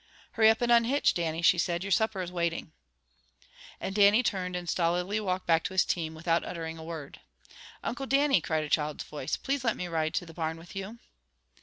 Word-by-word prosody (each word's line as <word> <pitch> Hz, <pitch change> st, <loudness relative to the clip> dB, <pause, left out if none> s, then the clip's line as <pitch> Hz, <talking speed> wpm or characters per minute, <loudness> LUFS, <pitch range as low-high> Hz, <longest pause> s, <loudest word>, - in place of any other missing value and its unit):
"Hurry 220 Hz, -1 st, +5 dB
up, 225 Hz, +2 st, +2 dB
and 240 Hz, -, +2 dB
unhitch, 235 Hz, +4 st, +4 dB
Dannie," 165 Hz, -1 st, -2 dB
she 175 Hz, 0 st, +5 dB
said. 170 Hz, +1 st, 0 dB
"Your 200 Hz, -, -5 dB
supper 200 Hz, -1 st, +1 dB
is 175 Hz, -, -7 dB
waiting." 170 Hz, -2 st, -2 dB, 1.1 s
And 190 Hz, -, -4 dB
Dannie 205 Hz, +3 st, +5 dB
turned 180 Hz, -4 st, -2 dB
and 175 Hz, -1 st, -4 dB
stolidly 180 Hz, +5 st, 0 dB
walked 185 Hz, -3 st, -2 dB
back 165 Hz, -1 st, +3 dB
to 190 Hz, -, -4 dB
his 190 Hz, -, +4 dB
team, 160 Hz, -2 st, -2 dB
without 165 Hz, +1 st, 0 dB
uttering 165 Hz, -1 st, -6 dB
a -, -, -8 dB
word. 160 Hz, -3 st, -8 dB, 0.6 s
"Uncle 270 Hz, +2 st, -3 dB
Dannie!" 275 Hz, -, +3 dB
cried 155 Hz, 0 st, -1 dB
a -, -, -4 dB
child's 150 Hz, -1 st, 0 dB
voice. 150 Hz, -1 st, -4 dB
"Please 275 Hz, -1 st, -2 dB
let 230 Hz, -3 st, +1 dB
me 180 Hz, -, -4 dB
ride 160 Hz, -2 st, -1 dB
to -, -, -1 dB
the 165 Hz, -, -12 dB
barn 160 Hz, -1 st, -3 dB
with 165 Hz, +3 st, -13 dB
you!" 195 Hz, +4 st, -6 dB
175 Hz, 205 wpm, -29 LUFS, 165-210 Hz, 1.1 s, Hurry